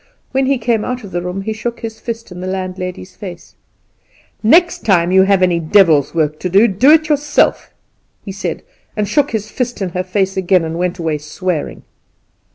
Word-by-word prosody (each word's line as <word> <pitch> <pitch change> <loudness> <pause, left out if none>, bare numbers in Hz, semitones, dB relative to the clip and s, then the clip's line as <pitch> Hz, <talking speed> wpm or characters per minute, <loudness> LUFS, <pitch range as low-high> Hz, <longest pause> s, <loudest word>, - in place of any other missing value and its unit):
When 265 0 +1
he 275 0 +2
came 225 -2 0
out 250 -1 -4
of 200 - -10
the 175 - -2
room 180 +2 -4
he 220 +2 -3
shook 235 +2 -5
his 225 -1 -6
fist 230 -3 -6
in 180 0 -8
the 185 - -5
landlady's 185 0 -5
face. 180 -4 -10 0.9
"The 215 - -2
next 345 +7 +4
time 180 -4 +2
you 190 0 +6
have 190 -1 +3
any 175 -2 +2
devil's 165 -4 +3
work 155 -2 0
to 180 - -3
do, 200 +6 +5
do 230 +7 +3
it 315 0 +5
yourself," 295 0 +1 0.6
he 200 - -5
said, 190 -4 -4 0.3
and 210 - +1
he - - -7
shook 290 -1 +3
his 215 -2 -4
fist 245 -2 -3
in 190 -2 -2
her 180 +1 -3
face 190 +1 -1
again, 185 -1 +2
and 165 +1 -4
went 180 0 -1
away 160 -3 -2
swearing. 155 +2 -4
190 Hz, 205 wpm, -16 LUFS, 180-230 Hz, 0.9 s, you